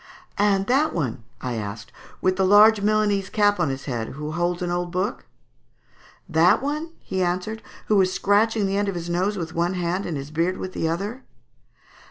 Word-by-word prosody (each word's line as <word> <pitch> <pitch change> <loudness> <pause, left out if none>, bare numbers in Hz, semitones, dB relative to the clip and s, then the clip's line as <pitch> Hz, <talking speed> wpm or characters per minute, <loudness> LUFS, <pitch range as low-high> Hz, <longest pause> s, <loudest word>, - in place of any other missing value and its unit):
"And 200 -1 +3
that 275 +7 +2
one," 125 -8 -3 0.2
I 125 -1 -3
asked, 110 -1 -6 0.3
"with 185 0 +2
the 190 - +1
large 205 +2 +6
Milanese 205 -2 +1
cap 205 -2 +2
on 165 -5 +1
his 135 0 -5
head, 120 -5 -3
who 150 +2 -5
holds 175 +2 -1
an 175 - -2
old 175 0 -1
book?" 190 +6 -2 1.0
"That 165 +1 +4
one," 305 +4 -3
he 190 - -2
answered, 185 +5 -2 0.2
"who 210 -2 +4
is 185 0 +2
scratching 210 +2 +2
the 195 0 0
end 205 0 0
of 195 - -4
his 170 0 -4
nose 190 +4 0
with 165 -3 -5
one 175 +2 0
hand 180 +2 -2
and 165 -4 -3
his 140 +2 -7
beard 170 +4 0
with 185 - -6
the 160 - -1
other?" 205 +10 -4
185 Hz, 195 wpm, -23 LUFS, 170-205 Hz, 1.0 s, large